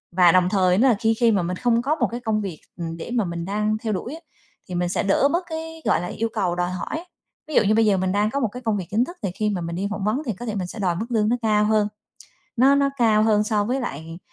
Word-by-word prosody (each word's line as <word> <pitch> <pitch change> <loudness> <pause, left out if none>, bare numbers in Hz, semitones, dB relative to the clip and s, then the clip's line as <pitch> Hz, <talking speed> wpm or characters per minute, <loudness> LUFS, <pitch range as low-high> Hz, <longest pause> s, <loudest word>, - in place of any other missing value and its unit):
Và 180 -2 +6
đồng 185 0 +3
thời 185 -2 +3
nó 260 +6 +4
là 240 - +4
khi 225 0 +2
khi 235 -2 +4
mà 195 -4 +2
mình 180 +1 -3
không 235 0 +2
có 285 +5 0
một 250 -7 +1
cái 240 - -4
công 220 -3 -1
việc, 185 -6 -5 0.2
ừm, 165 -1 -5
để 240 - -7
mà 230 -4 +1
mình 170 -1 -4
đang 210 +2 0
theo 220 -1 -3
đuổi 235 +8 -4
á 320 - -8 0.5
thì 180 - -4
mình 175 0 0
sẽ 180 - -1
đỡ 200 +8 +3
bớt 350 +2 +1
cái, 325 0 -6
gọi - - +2
là, 180 - -4
yêu 225 +5 -2
cầu 175 -2 0
đòi 180 0 -1
hỏi. 305 - -5 0.4
Ví 310 - -5
dụ - - +6
như 215 +1 +2
bây 225 0 +4
giờ 200 -2 +3
mình 185 0 0
đang 205 +2 +1
có 280 - -1
một 240 - +1
cái 250 +2 -8
công 220 -2 +1
việc 185 -3 -5
chính 230 +4 +2
thức 350 +1 -10
thì 190 - -1
khi 215 -1 0
mà 185 -4 -2
mình 170 0 -4
đi 195 +3 -2
phỏng 205 -2 -4
vấn 215 +7 0
thì 230 - -1
có 235 +6 -8
thể 220 -3 -3
mình 185 -3 -3
sẽ 215 - -9
đòi 180 -3 0
mức 215 +7 -3
lương 220 -2 +1
nó 245 - +2
cao 210 -1 +2
hơn. 215 -1 +2 0.7
Nó 270 +4 +5
nó 280 0 +3
cao 220 -4 +3
hơn 215 -1 +3
so 210 -1 +1
với 255 +5 -1
lại 165 - -6
215 Hz, 310 wpm, -23 LUFS, 185-240 Hz, 0.7 s, Và